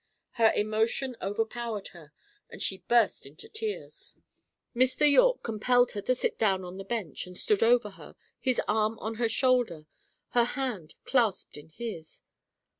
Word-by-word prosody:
Her 225 Hz, -2 st, +4 dB
emotion 220 Hz, +5 st, 0 dB
overpowered 220 Hz, +1 st, -3 dB
her, 160 Hz, -4 st, -15 dB, 0.4 s
and -, -, -10 dB
she 190 Hz, -, -1 dB
burst 235 Hz, -11 st, +2 dB
into 150 Hz, +4 st, -11 dB
tears. 435 Hz, -1 st, -6 dB, 0.6 s
Mr. 255 Hz, +4 st, +3 dB
Yorke -, -, +4 dB
compelled 245 Hz, +2 st, +2 dB
her 205 Hz, -, -4 dB
to 255 Hz, +5 st, +1 dB
sit -, -, -2 dB
down 195 Hz, -4 st, +2 dB
on 180 Hz, +1 st, -8 dB
the -, -, -5 dB
bench, 195 Hz, -, -4 dB
and 180 Hz, 0 st, -11 dB
stood 210 Hz, -, +1 dB
over 230 Hz, -2 st, +4 dB
her -, -, -13 dB, 0.2 s
his 255 Hz, -2 st, 0 dB
arm 220 Hz, +1 st, +1 dB
on 220 Hz, 0 st, -5 dB
her 230 Hz, -, +2 dB
shoulder, 240 Hz, -, +1 dB, 0.4 s
her 240 Hz, -1 st, +3 dB
hand 230 Hz, -, -4 dB
clasped 230 Hz, -8 st, +1 dB
in 150 Hz, +2 st, -11 dB
his. 170 Hz, -4 st, -8 dB
225 Hz, 155 wpm, -28 LUFS, 195-245 Hz, 0.6 s, Her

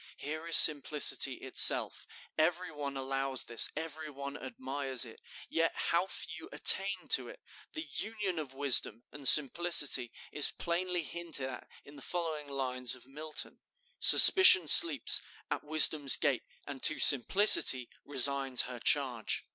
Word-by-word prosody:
Here 155 Hz, +3 st, -10 dB
is 170 Hz, -, +4 dB
simplicity 150 Hz, -1 st, +3 dB
itself. -, -, +1 dB, 0.3 s
Every 175 Hz, +2 st, -5 dB
one 140 Hz, -2 st, -11 dB
allows 135 Hz, 0 st, -6 dB
this, 115 Hz, -, 0 dB
every 160 Hz, -1 st, -11 dB
one 140 Hz, 0 st, -12 dB
admires 140 Hz, -, -7 dB
it, 115 Hz, -, -19 dB, 0.3 s
yet 165 Hz, 0 st, -5 dB
how 175 Hz, +3 st, -5 dB
few 165 Hz, -3 st, -11 dB
attain 195 Hz, +2 st, -1 dB
to -, -, -1 dB
it! -, -, -17 dB, 0.3 s
The 315 Hz, -, -10 dB
union 210 Hz, -, -9 dB
of 135 Hz, -4 st, -12 dB
wisdom 130 Hz, -4 st, -2 dB
and 145 Hz, -2 st, -2 dB
simplicity 145 Hz, -4 st, +4 dB, 0.2 s
is 150 Hz, -, 0 dB
plainly 175 Hz, 0 st, -7 dB
hinted 160 Hz, -5 st, -9 dB
at 130 Hz, -, -14 dB, 0.2 s
in 145 Hz, +1 st, -19 dB
the -, -, -15 dB
following 160 Hz, -4 st, -9 dB
lines 130 Hz, -3 st, -5 dB
of 125 Hz, -, -20 dB
Milton: 150 Hz, +3 st, -9 dB, 0.4 s
"Suspicion 370 Hz, -, +7 dB
sleeps 150 Hz, -1 st, +5 dB, 0.3 s
At -, -, -7 dB
Wisdom's 150 Hz, -2 st, +1 dB
gate, 140 Hz, -6 st, -5 dB, 0.2 s
and 140 Hz, -2 st, -13 dB
to 155 Hz, -, +2 dB
Simplicity 135 Hz, -, +2 dB, 0.2 s
Resigns 135 Hz, -2 st, 0 dB
her 125 Hz, -1 st, -11 dB
charge.'" 125 Hz, -3 st, -4 dB
145 Hz, 140 wpm, -27 LUFS, 135-170 Hz, 0.4 s, Suspicion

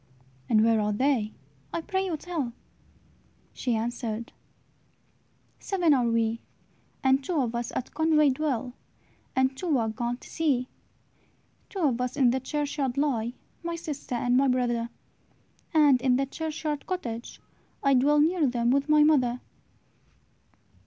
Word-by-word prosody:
"And 215 Hz, -1 st, +5 dB
where 225 Hz, -1 st, +3 dB
are 210 Hz, 0 st, 0 dB
they? 230 Hz, -1 st, +1 dB, 0.4 s
I 335 Hz, -, -2 dB
pray 380 Hz, +3 st, -1 dB
you 330 Hz, -4 st, -2 dB
tell." 300 Hz, -8 st, -4 dB, 1.0 s
She 245 Hz, -3 st, -1 dB
answered, 230 Hz, 0 st, -3 dB, 1.3 s
"Seven 355 Hz, -6 st, +2 dB
are 250 Hz, -3 st, +2 dB
we; 230 Hz, 0 st, 0 dB, 0.6 s
And 265 Hz, +1 st, +3 dB
two 355 Hz, +2 st, -2 dB
of 245 Hz, -4 st, 0 dB
us 235 Hz, 0 st, -3 dB
at 255 Hz, -, -4 dB
Conway 305 Hz, -2 st, +4 dB
dwell, 260 Hz, -3 st, -2 dB, 0.6 s
And 260 Hz, 0 st, +2 dB
two 315 Hz, -1 st, 0 dB
are 225 Hz, -2 st, 0 dB
gone 240 Hz, +2 st, -3 dB
to -, -, -14 dB
sea. 275 Hz, -6 st, 0 dB, 1.0 s
"Two 390 Hz, -, -5 dB
of 255 Hz, -6 st, +2 dB
us 250 Hz, +2 st, -2 dB
in 255 Hz, -4 st, +5 dB
the 260 Hz, -, 0 dB
churchyard 280 Hz, -1 st, -2 dB
lie, 245 Hz, -5 st, 0 dB, 0.3 s
My 340 Hz, 0 st, -3 dB
sister 300 Hz, -6 st, -5 dB
and 245 Hz, +1 st, +1 dB
my 275 Hz, +2 st, +4 dB
brother; 240 Hz, -2 st, 0 dB, 0.8 s
And 290 Hz, -6 st, +5 dB
in 255 Hz, -1 st, +3 dB
the 275 Hz, +2 st, +1 dB
churchyard 305 Hz, 0 st, -4 dB
cottage, 240 Hz, -11 st, -5 dB, 0.4 s
I 275 Hz, -, +4 dB
Dwell 290 Hz, +3 st, +4 dB
near 325 Hz, -1 st, +3 dB
them 240 Hz, -1 st, +1 dB
with 280 Hz, +3 st, +1 dB
my 300 Hz, 0 st, +6 dB
mother." 255 Hz, -5 st, +3 dB
265 Hz, 145 wpm, -27 LUFS, 240-300 Hz, 1.3 s, my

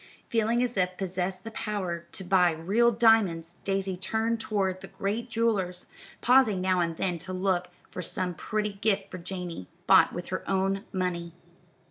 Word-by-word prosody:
Feeling 230 Hz, +1 st, +2 dB
as 245 Hz, -3 st, -2 dB
if 180 Hz, -1 st, +3 dB
she 185 Hz, -, -19 dB
possessed 185 Hz, 0 st, -3 dB
the 225 Hz, -, -7 dB
power 185 Hz, -6 st, -3 dB
to 190 Hz, -, -5 dB
buy 180 Hz, -1 st, +4 dB
real 200 Hz, +9 st, +3 dB
diamonds, 200 Hz, -8 st, +3 dB
Daisy 195 Hz, -1 st, -1 dB
turned 220 Hz, +5 st, -1 dB
toward 190 Hz, -4 st, -1 dB
the -, -, -8 dB
great 220 Hz, +5 st, -3 dB
jewellers, 205 Hz, -6 st, 0 dB, 0.4 s
pausing 245 Hz, -6 st, +5 dB
now 185 Hz, 0 st, +2 dB
and 170 Hz, -1 st, 0 dB
then 175 Hz, -3 st, -1 dB
to 185 Hz, +3 st, -6 dB
look 185 Hz, -1 st, 0 dB, 0.2 s
for 185 Hz, -, -5 dB
some 180 Hz, +1 st, -2 dB
pretty 210 Hz, +4 st, -2 dB
gift 200 Hz, -1 st, 0 dB
for 185 Hz, -, -6 dB
Janey, 175 Hz, -, -6 dB, 0.2 s
bought -, -, +6 dB
with 175 Hz, 0 st, -6 dB
her 185 Hz, -, -3 dB
own 195 Hz, +1 st, 0 dB
money. 175 Hz, -2 st, -2 dB
190 Hz, 170 wpm, -28 LUFS, 180-215 Hz, 0.4 s, bought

